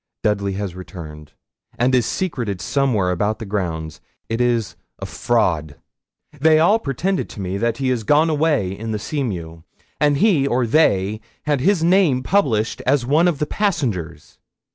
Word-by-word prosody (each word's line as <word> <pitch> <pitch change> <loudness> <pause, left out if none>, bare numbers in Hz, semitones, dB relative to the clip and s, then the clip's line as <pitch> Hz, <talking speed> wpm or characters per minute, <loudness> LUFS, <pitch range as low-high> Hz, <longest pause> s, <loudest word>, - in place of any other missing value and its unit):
Dudley 100 -2 0
has 100 -2 -4
returned, 80 -5 -10 0.4
and 125 +2 +2
is 125 -3 +3
secreted 120 - -3
somewhere 110 -5 0
about 105 +4 -1
the 110 - -7
grounds. 85 -6 -4 0.3
It 115 +2 -1
is 120 -3 0 0.2
a - - -6
fraud. 85 -11 0 0.6
They 155 +2 +5
all 180 +8 +4
pretend 180 - -2
to - - -10
me 95 0 -3
that 115 +1 0
he 130 -2 0
is 120 -3 -1
gone 150 +7 +3
away 150 - +1
in 110 +3 -5
the - - -1
Seamew; 95 - -4 0.4
and 145 -1 +3
he 155 -7 +3
or 125 -1 +1
they 110 -6 +2 0.2
had 145 -3 0
his 185 +1 +2
name 170 -8 +3
published 125 - +1
as 130 -2 +2
one 155 +7 +3
of 170 -5 +1
the 150 - -1
passengers. 115 - -3
120 Hz, 165 wpm, -20 LUFS, 100-150 Hz, 0.6 s, They